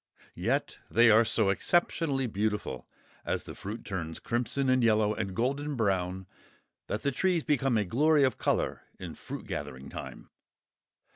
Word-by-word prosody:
Yet -, -, -1 dB
they 115 Hz, 0 st, +6 dB
are 110 Hz, +2 st, +7 dB
so 110 Hz, -2 st, +2 dB
exceptionally 145 Hz, -, +1 dB
beautiful, 105 Hz, -, -2 dB, 0.4 s
as -, -, -2 dB
the -, -, -8 dB
fruit 105 Hz, +4 st, -7 dB
turns 85 Hz, -5 st, -4 dB
crimson 125 Hz, +3 st, -1 dB
and 130 Hz, -1 st, +3 dB
yellow 110 Hz, -2 st, +3 dB
and 100 Hz, -4 st, -4 dB
golden 140 Hz, +5 st, -1 dB
brown, 95 Hz, -4 st, 0 dB, 0.6 s
that 105 Hz, -, -3 dB
the 140 Hz, -, +1 dB
trees 175 Hz, +4 st, +1 dB
become 135 Hz, -5 st, +2 dB
a 105 Hz, -, +1 dB
glory 145 Hz, -, +3 dB
of 130 Hz, -, +1 dB
colour -, -, 0 dB, 0.2 s
in -, -, -7 dB
fruit -, -, -8 dB
gathering 65 Hz, +1 st, -6 dB
time. -, -, -9 dB
115 Hz, 150 wpm, -29 LUFS, 100-135 Hz, 0.6 s, are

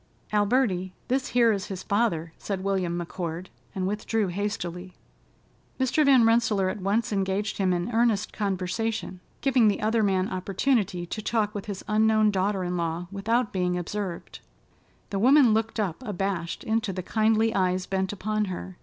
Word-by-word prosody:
"Alberty, 205 Hz, -4 st, +1 dB, 0.2 s
this 260 Hz, +1 st, +1 dB
here 235 Hz, -2 st, +4 dB
is 200 Hz, -3 st, -2 dB
his 190 Hz, -3 st, -6 dB
father," 200 Hz, -7 st, 0 dB
said 195 Hz, -2 st, -4 dB
William 185 Hz, -3 st, 0 dB
McCord 170 Hz, 0 st, -5 dB, 0.3 s
and 185 Hz, -1 st, -1 dB
withdrew 210 Hz, +1 st, -1 dB
hastily. 180 Hz, -2 st, -4 dB, 0.9 s
Mr. 260 Hz, +4 st, +2 dB
Van 265 Hz, -5 st, +6 dB
Rensselaer 225 Hz, -4 st, +3 dB
at 195 Hz, -, -5 dB
once 210 Hz, +4 st, 0 dB
engaged 195 Hz, +1 st, -1 dB
him 190 Hz, -2 st, +2 dB
in 175 Hz, +5 st, -1 dB
earnest 225 Hz, -3 st, +1 dB
conversation, 200 Hz, 0 st, -2 dB, 0.2 s
giving 255 Hz, -5 st, +4 dB
the 205 Hz, -, +1 dB
other 220 Hz, +1 st, +1 dB
man 190 Hz, -2 st, +2 dB
opportunity 195 Hz, -1 st, 0 dB
to 215 Hz, +5 st, -5 dB
talk 215 Hz, -1 st, 0 dB
with 205 Hz, -1 st, -6 dB
his 200 Hz, -2 st, -6 dB
unknown 215 Hz, 0 st, +3 dB
daughter 195 Hz, 0 st, 0 dB
in 180 Hz, 0 st, -2 dB
law 170 Hz, +1 st, -2 dB
without 220 Hz, +4 st, 0 dB
being 180 Hz, -1 st, 0 dB
observed. 180 Hz, 0 st, -5 dB, 0.7 s
The 200 Hz, -, -1 dB
woman 255 Hz, +1 st, +6 dB
looked 225 Hz, +1 st, -1 dB
up 195 Hz, 0 st, -2 dB
abashed 195 Hz, -5 st, -3 dB
into 220 Hz, -2 st, 0 dB
the 185 Hz, -1 st, -5 dB
kindly 220 Hz, +2 st, +2 dB
eyes 185 Hz, -1 st, +1 dB
bent 190 Hz, 0 st, -1 dB
upon 215 Hz, +1 st, -1 dB
her. 185 Hz, -1 st, -7 dB
200 Hz, 160 wpm, -26 LUFS, 185-220 Hz, 0.9 s, Van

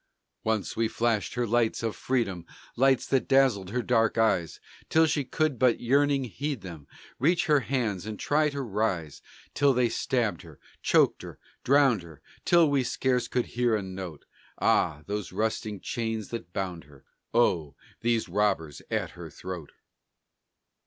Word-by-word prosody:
Once 110 Hz, -2 st, -1 dB
we 115 Hz, 0 st, +1 dB
flashed 115 Hz, -1 st, -1 dB
her 120 Hz, 0 st, 0 dB
lights 115 Hz, 0 st, +1 dB
of 115 Hz, -2 st, -1 dB
freedom, 110 Hz, -9 st, -1 dB, 0.3 s
Lights 135 Hz, -1 st, +3 dB
that 135 Hz, -2 st, 0 dB
dazzled 130 Hz, -9 st, +3 dB
her 125 Hz, +3 st, -2 dB
dark 115 Hz, -3 st, +2 dB
eyes 95 Hz, -7 st, +1 dB, 0.3 s
Till 160 Hz, 0 st, +5 dB
she 150 Hz, -2 st, 0 dB
could 150 Hz, 0 st, -1 dB
but 125 Hz, -2 st, +3 dB
yearning 140 Hz, +2 st, +2 dB
heed 140 Hz, +2 st, -4 dB
them, 80 Hz, -6 st, -9 dB, 0.3 s
Reach 170 Hz, +7 st, +2 dB
her 150 Hz, -3 st, +4 dB
hands 110 Hz, -8 st, -2 dB
and 110 Hz, -2 st, -6 dB
try 150 Hz, +1 st, +2 dB
to 140 Hz, -1 st, -4 dB
rise. 100 Hz, -, -2 dB, 0.3 s
Then 140 Hz, -1 st, +3 dB
they 125 Hz, -1 st, +3 dB
stabbed 115 Hz, -, -1 dB
her, -, -, -14 dB, 0.2 s
choked -, -, +3 dB
her, -, -, -9 dB, 0.3 s
drowned 135 Hz, -6 st, +4 dB
her 80 Hz, -4 st, -14 dB, 0.2 s
Till 170 Hz, -2 st, +5 dB
we 140 Hz, -2 st, +2 dB
scarce 125 Hz, -1 st, 0 dB
could 125 Hz, 0 st, 0 dB
hear 120 Hz, -2 st, +1 dB
a 105 Hz, -, -2 dB
note. 95 Hz, -5 st, -7 dB, 0.3 s
Ah! 75 Hz, -, +2 dB
these 105 Hz, -1 st, -4 dB
rusting 105 Hz, 0 st, -2 dB
chains 110 Hz, -2 st, -3 dB
that 100 Hz, -8 st, -6 dB
bound 90 Hz, -3 st, -4 dB
her! 70 Hz, -2 st, -19 dB, 0.3 s
Oh! 85 Hz, -11 st, +2 dB, 0.2 s
these 115 Hz, -1 st, 0 dB
robbers 95 Hz, -9 st, 0 dB
at -, -, -1 dB
her -, -, -9 dB
throat! 90 Hz, -5 st, -8 dB
115 Hz, 160 wpm, -27 LUFS, 95-130 Hz, 0.3 s, Till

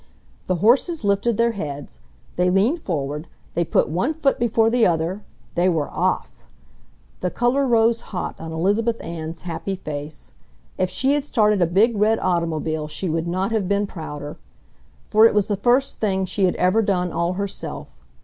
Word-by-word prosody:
The 185 Hz, -, +1 dB
horses 245 Hz, -, +2 dB
lifted 200 Hz, +3 st, +1 dB
their 235 Hz, 0 st, +3 dB
heads, 145 Hz, -9 st, -6 dB, 0.4 s
they 180 Hz, +1 st, +2 dB
leaned 220 Hz, -, +2 dB
forward, 150 Hz, -2 st, -3 dB, 0.3 s
they 170 Hz, -, +1 dB
put -, -, +2 dB
one 210 Hz, -, -1 dB
foot 285 Hz, -4 st, +1 dB
before 225 Hz, -1 st, +2 dB
the 240 Hz, -1 st, +2 dB
other... 175 Hz, +3 st, +1 dB, 0.3 s
they 175 Hz, +2 st, +2 dB
were 160 Hz, -5 st, -1 dB
off! -, -, -2 dB, 0.7 s
The 180 Hz, -, -1 dB
color 250 Hz, +7 st, +1 dB
rose 230 Hz, -1 st, +3 dB
hot 180 Hz, -3 st, -5 dB
on 160 Hz, 0 st, -7 dB
Elizabeth 205 Hz, +8 st, 0 dB
Ann's 165 Hz, -1 st, -6 dB
happy 180 Hz, +2 st, -4 dB
face. 150 Hz, -4 st, -7 dB, 0.4 s
If 185 Hz, -1 st, 0 dB
she 270 Hz, +7 st, +1 dB
had 290 Hz, -1 st, +1 dB
started 210 Hz, -8 st, +2 dB
a 175 Hz, -, +4 dB
big 210 Hz, +7 st, +3 dB
red 215 Hz, +2 st, +3 dB
automobile 160 Hz, -4 st, -1 dB
she 155 Hz, +4 st, -4 dB
would 165 Hz, +1 st, -1 dB
not 185 Hz, +4 st, -1 dB
have 210 Hz, -5 st, 0 dB
been 200 Hz, 0 st, +1 dB
prouder. 150 Hz, -5 st, -7 dB, 0.7 s
For 220 Hz, +1 st, +6 dB
it 225 Hz, -, -2 dB
was 205 Hz, -2 st, +2 dB
the 205 Hz, -, 0 dB
first 250 Hz, +6 st, +1 dB
thing 190 Hz, -3 st, 0 dB
she 190 Hz, +1 st, 0 dB
had 180 Hz, -, +1 dB
ever 185 Hz, +5 st, +3 dB
done 180 Hz, -4 st, 0 dB
all 170 Hz, +1 st, 0 dB
herself 200 Hz, +1 st, -5 dB
190 Hz, 175 wpm, -22 LUFS, 170-225 Hz, 0.7 s, For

